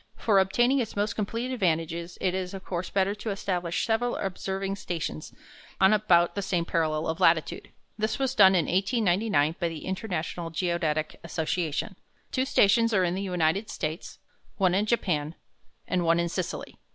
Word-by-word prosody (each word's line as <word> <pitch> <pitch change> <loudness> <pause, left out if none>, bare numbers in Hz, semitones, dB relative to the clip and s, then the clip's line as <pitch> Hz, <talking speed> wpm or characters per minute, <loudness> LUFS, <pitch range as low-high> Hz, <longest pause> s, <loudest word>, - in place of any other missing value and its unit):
For 205 -4 +3
obtaining 240 +8 +3
its 235 - -3
most 205 +1 -1
complete 230 +4 -3
advantages 170 -5 -1
it 185 - 0
is, 185 0 -3
of 190 - -9
course, 175 -1 -3
better 195 0 +1
to 210 +1 -6
establish 180 -4 -2
several 240 +2 0
observing 195 +1 -3
stations 165 - -5 0.5
on 190 +2 +6
about 180 -5 +3
the 200 - -2
same 180 -3 -1
parallel 155 -2 0
of 160 0 -2
latitude. 165 -1 +2 0.3
This 215 0 0
was 265 -1 0
done 195 -6 +7
in 175 - +2
1899 190 - +1
by 170 -1 0
the 160 -2 -7
International 180 -3 -3
Geodetic 165 -2 -1
Association. 170 +3 -2 0.3
Two 260 0 0
stations 230 -3 +3
are 190 - +4
in 175 -1 +1
the 190 - -3
United 180 +2 0
States, 155 +3 -5 0.4
one 185 -3 +3
in 205 +3 +1
Japan, 165 -9 0 0.5
and 180 -1 0
one 165 0 +3
in 170 0 0
Sicily. 180 0 -5
185 Hz, 165 wpm, -27 LUFS, 170-205 Hz, 0.5 s, done